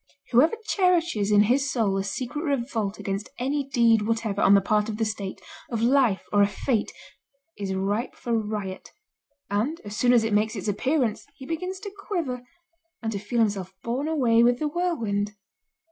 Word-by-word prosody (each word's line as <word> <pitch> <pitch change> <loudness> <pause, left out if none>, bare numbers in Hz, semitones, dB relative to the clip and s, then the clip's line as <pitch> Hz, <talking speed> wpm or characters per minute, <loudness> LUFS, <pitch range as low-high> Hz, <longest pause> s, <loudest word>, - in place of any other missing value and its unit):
Whoever 275 - +5
cherishes 345 - +2
in 205 0 +6
his 270 +6 +2
soul 215 -6 +1
a 195 - 0
secret 250 +8 -4
revolt 240 - -1
against 195 +1 -4
any 275 +2 -1
deed 230 -4 +4
whatever 220 -2 -1
on 200 - +6
the - - +7
part 210 +2 +1
of 215 - -4
the 225 - +1
state, 205 -3 -4 0.3
of 230 -2 -2
life 245 -5 +3
or 205 - +5
of 200 - +4
fate, 220 +2 -1 0.6
is 195 -2 -3
ripe 205 +6 -1
for 235 - -3
riot, 210 -3 -3 0.6
and, 235 +11 0
as 205 0 -6
soon 245 +2 +3
as 240 -2 +5
it 225 -1 -1
makes 215 +2 +2
its 200 0 -5
appearance, 250 +2 0
he 265 - -10
begins 365 +5 -4
to 410 -1 -6
quiver, 340 -11 -3 0.6
and 220 - -1
to 200 - -3
feel 210 +4 -4
himself 195 -4 -1
borne 255 +6 -2
away 250 -8 +3
with 240 +1 +4
the 305 - -1
whirlwind. 230 - -1
230 Hz, 180 wpm, -25 LUFS, 205-275 Hz, 0.6 s, the